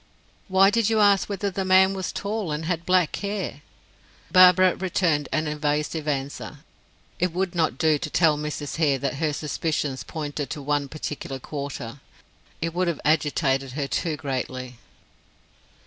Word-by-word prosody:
"Why 195 Hz, 0 st, +5 dB
did 225 Hz, -1 st, +2 dB
you 220 Hz, -1 st, +2 dB
ask 200 Hz, -1 st, +4 dB
whether 200 Hz, 0 st, -2 dB
the 190 Hz, +1 st, -2 dB
man 190 Hz, +1 st, +5 dB
was 190 Hz, -1 st, -3 dB
tall, 205 Hz, -4 st, -3 dB
and 150 Hz, +2 st, -3 dB
had 170 Hz, -1 st, -2 dB
black 180 Hz, -3 st, +3 dB
hair?" 200 Hz, -7 st, -4 dB, 0.7 s
Barbara 185 Hz, 0 st, +7 dB
returned 170 Hz, -5 st, 0 dB
an 155 Hz, 0 st, 0 dB
evasive 150 Hz, +1 st, -1 dB
answer. 140 Hz, 0 st, -4 dB, 0.6 s
It 180 Hz, 0 st, +1 dB
would 185 Hz, 0 st, -1 dB
not 160 Hz, -7 st, 0 dB
do 155 Hz, -1 st, +3 dB
to 155 Hz, -, -4 dB
tell 160 Hz, -1 st, +3 dB
Mrs. 150 Hz, 0 st, -4 dB
Hare 150 Hz, -4 st, +2 dB
that 135 Hz, 0 st, -3 dB
her 155 Hz, 0 st, 0 dB
suspicions 150 Hz, -2 st, -2 dB
pointed 145 Hz, -2 st, -5 dB
to 155 Hz, -, -5 dB
one 145 Hz, 0 st, 0 dB
particular 150 Hz, -2 st, -5 dB
quarter; 140 Hz, -2 st, -6 dB, 0.6 s
it 165 Hz, 0 st, -2 dB
would 180 Hz, +1 st, 0 dB
have 170 Hz, -3 st, -1 dB
agitated 140 Hz, -3 st, +1 dB
her 140 Hz, 0 st, -2 dB
too 160 Hz, +1 st, -1 dB
greatly. 130 Hz, -3 st, -4 dB
155 Hz, 155 wpm, -25 LUFS, 145-185 Hz, 0.7 s, Barbara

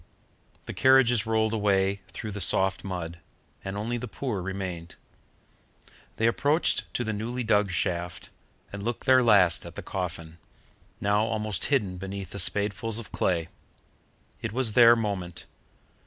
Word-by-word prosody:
The -, -, -6 dB
carriages 125 Hz, -4 st, +4 dB
rolled 110 Hz, 0 st, +1 dB
away 100 Hz, -2 st, +1 dB
through 110 Hz, -, -7 dB
the 100 Hz, 0 st, -4 dB
soft 95 Hz, +2 st, +3 dB
mud, 85 Hz, -3 st, -5 dB, 0.4 s
and 95 Hz, +1 st, -5 dB
only 115 Hz, +4 st, -2 dB
the 125 Hz, +1 st, -6 dB
poor 110 Hz, -2 st, -4 dB
remained. 90 Hz, -2 st, -6 dB, 1.2 s
They 110 Hz, -, 0 dB
approached 145 Hz, +7 st, +1 dB
to 125 Hz, -, 0 dB
the 110 Hz, -1 st, -3 dB
newly 120 Hz, +4 st, -3 dB
dug 105 Hz, -2 st, +2 dB
shaft 85 Hz, -1 st, -3 dB, 0.4 s
and 100 Hz, -, -6 dB
looked 115 Hz, +3 st, -4 dB
their 130 Hz, -1 st, +6 dB
last 100 Hz, -7 st, +4 dB
at -, -, -11 dB
the -, -, -7 dB
coffin, 85 Hz, -3 st, -5 dB, 0.6 s
now 105 Hz, +2 st, +1 dB
almost 110 Hz, -4 st, -2 dB
hidden 105 Hz, -10 st, 0 dB
beneath 95 Hz, -1 st, -7 dB
the 100 Hz, -, -3 dB
spadefuls 105 Hz, +3 st, +1 dB
of 115 Hz, -, -7 dB
clay. 85 Hz, -3 st, -1 dB, 0.9 s
It -, -, -4 dB
was 120 Hz, -3 st, 0 dB
their 120 Hz, 0 st, +7 dB
moment. 95 Hz, -6 st, -4 dB
105 Hz, 145 wpm, -27 LUFS, 95-115 Hz, 1.2 s, their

